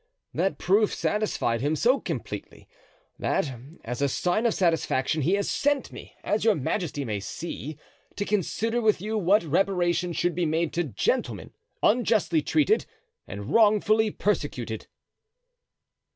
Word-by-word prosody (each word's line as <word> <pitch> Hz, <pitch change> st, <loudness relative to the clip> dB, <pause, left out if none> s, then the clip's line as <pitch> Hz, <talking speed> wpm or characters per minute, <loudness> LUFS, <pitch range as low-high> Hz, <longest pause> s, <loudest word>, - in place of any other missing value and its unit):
That 190 Hz, -, 0 dB
proof 205 Hz, +3 st, +3 dB
satisfied 205 Hz, -, 0 dB
him 145 Hz, +3 st, +1 dB
so 250 Hz, -, +3 dB
completely -, -, -6 dB, 0.5 s
that, 145 Hz, -8 st, 0 dB, 0.3 s
as 125 Hz, +3 st, -4 dB
a 140 Hz, -, +2 dB
sign 180 Hz, -, +1 dB
of 230 Hz, -, 0 dB
satisfaction, 160 Hz, -4 st, +1 dB
he 165 Hz, +7 st, +2 dB
has 200 Hz, -, -1 dB
sent 290 Hz, -1 st, 0 dB
me, -, -, -11 dB
as 210 Hz, -, 0 dB
your 220 Hz, -2 st, +4 dB
majesty 150 Hz, -1 st, -2 dB
may 105 Hz, -3 st, -2 dB
see, 155 Hz, -, -6 dB, 0.4 s
to 205 Hz, -, -2 dB
consider 220 Hz, +4 st, 0 dB
with 215 Hz, -4 st, +3 dB
you 215 Hz, +4 st, -3 dB
what 205 Hz, 0 st, +3 dB
reparation 175 Hz, +1 st, +1 dB
should 175 Hz, +1 st, 0 dB
be 170 Hz, 0 st, 0 dB
made 160 Hz, +1 st, 0 dB
to 175 Hz, 0 st, 0 dB
gentlemen 125 Hz, -10 st, -2 dB, 0.3 s
unjustly 210 Hz, -8 st, +3 dB
treated 315 Hz, -, +2 dB, 0.4 s
and 100 Hz, +1 st, -6 dB
wrongfully 215 Hz, 0 st, +4 dB
persecuted." 210 Hz, 0 st, -2 dB
180 Hz, 135 wpm, -26 LUFS, 155-215 Hz, 0.5 s, your